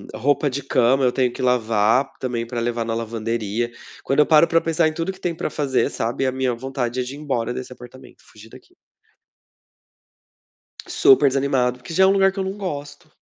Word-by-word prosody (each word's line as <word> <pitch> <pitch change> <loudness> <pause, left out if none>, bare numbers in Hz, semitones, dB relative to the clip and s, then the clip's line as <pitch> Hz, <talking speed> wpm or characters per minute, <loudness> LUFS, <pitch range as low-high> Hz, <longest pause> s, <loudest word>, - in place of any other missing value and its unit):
roupa 145 +3 +1
de 135 +1 -4
cama 130 0 +2
eu 125 - +3
tenho 125 -2 +1
que - - -8
lavar 115 0 +2
também 120 -2 -3
pra 120 0 -4
levar 115 0 -1
na 115 - -2
lavanderia, 115 0 -3 0.3
quando 135 - 0
eu 150 - +6
paro 160 +1 +5
pra 165 0 +2
pensar 165 0 +1
em 155 - -2
tudo 165 +3 -3
que 190 - -15
tem 175 -3 -2
pra - - -3
fazer, 135 -4 0
sabe, 120 +4 -2
a 130 - +1
minha 130 -1 -1
vontade 130 -1 -4
é - - 0
de 130 +2 -7
ir - - -10
embora 125 -5 -2
desse 125 0 -7
apartamento, 125 +1 -15
fugir 110 +1 -16
daqui. - - -17 2.1
Super 135 +1 +5
desanimado, 130 -2 0
porque 125 +6 -9
já 190 +2 +5
é - - +6
um - - +5
lugar 195 -1 +4
que 195 - -10
eu 190 - -1
não 190 - -3
gosto. 150 -8 -7
130 Hz, 210 wpm, -21 LUFS, 120-150 Hz, 2.1 s, eu